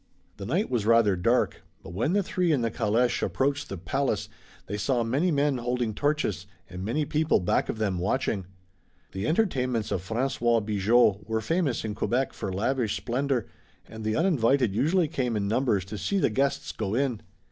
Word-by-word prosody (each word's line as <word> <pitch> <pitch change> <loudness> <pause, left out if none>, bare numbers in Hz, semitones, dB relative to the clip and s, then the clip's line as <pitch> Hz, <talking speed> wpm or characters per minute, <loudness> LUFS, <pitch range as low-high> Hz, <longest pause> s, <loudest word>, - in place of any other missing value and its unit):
The 100 0 -6
night 180 - +1
was 115 -4 0
rather 115 -4 +5
dark, 115 +8 +1 0.2
but 85 - -9
when 115 - 0
the 200 0 +2
three 180 -2 0
in 140 -5 +2
the 115 -1 0
caleche 115 +3 +1
approached 140 +1 -1
the 100 - -5
palace 110 +6 -1 0.4
they 100 - -4
saw 115 +4 0
many 135 +10 +1
men 145 -4 +1
holding 120 -2 -1
torches, 125 - -1 0.2
and 90 +1 -7
many 125 +9 0
people 155 +2 +2
back 90 - 0
of - - -2
them 100 -5 -1
watching. 100 -1 -1 0.6
The 95 +3 -3
entertainments 130 - 0
of 90 - -1
François 115 +1 0
Bigot 105 0 +2
were 110 0 +1
famous 150 0 -1
in 105 - -3
Quebec 125 +5 -1
for 100 - -4
lavish 110 +2 0
splendor, 125 +4 -1 0.4
and 110 0 -9
the 110 0 0
uninvited 135 - +2
usually 160 - +2
came 125 -6 -2
in 100 -1 -1
numbers 110 -4 +1
to 105 +1 -7
see 200 - -1
the 185 - +2
guests 135 +5 0
go 105 -1 -3
in. 130 -4 0
120 Hz, 180 wpm, -27 LUFS, 105-140 Hz, 0.6 s, rather